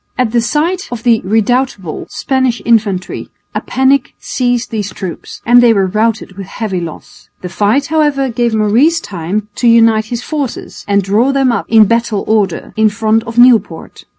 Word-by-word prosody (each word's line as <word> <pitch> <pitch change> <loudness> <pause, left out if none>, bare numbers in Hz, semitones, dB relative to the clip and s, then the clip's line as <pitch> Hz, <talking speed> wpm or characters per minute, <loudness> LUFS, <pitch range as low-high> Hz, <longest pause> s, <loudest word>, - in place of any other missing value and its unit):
At 250 -4 0
the 235 0 +2
sight 335 - -1
of 235 -2 -6
the 235 -2 +3
redoubtable 220 -3 -1
Spanish 260 -3 -1
infantry 210 -5 0 0.2
a - - -2
panic 265 +2 0
seized 245 -1 -2
these 205 -3 -3
troops 185 -2 -8
and 245 +1 +6
they 235 -2 +5
were 195 -3 +1
routed 215 0 -1
with 195 - -7
heavy 195 -4 -4
loss. 165 -2 -10
The 180 - -5
fight, 215 +9 +1
however, 295 -4 +1
gave 235 -1 -1
Maurice 235 +11 +2
time 195 - -4
to 245 - +1
unite 225 -2 +4
his 240 +2 -5
forces 290 -5 -5
and 200 -1 +1
draw 215 +8 +1
them 270 -2 +2
up 235 - -2
in 220 -1 +6
battle 230 -2 0
order 210 -5 -1
in 220 0 +3
front 220 +2 0
of 230 0 -8
Nieuport. 225 -9 +2
225 Hz, 175 wpm, -13 LUFS, 205-250 Hz, 0.2 s, and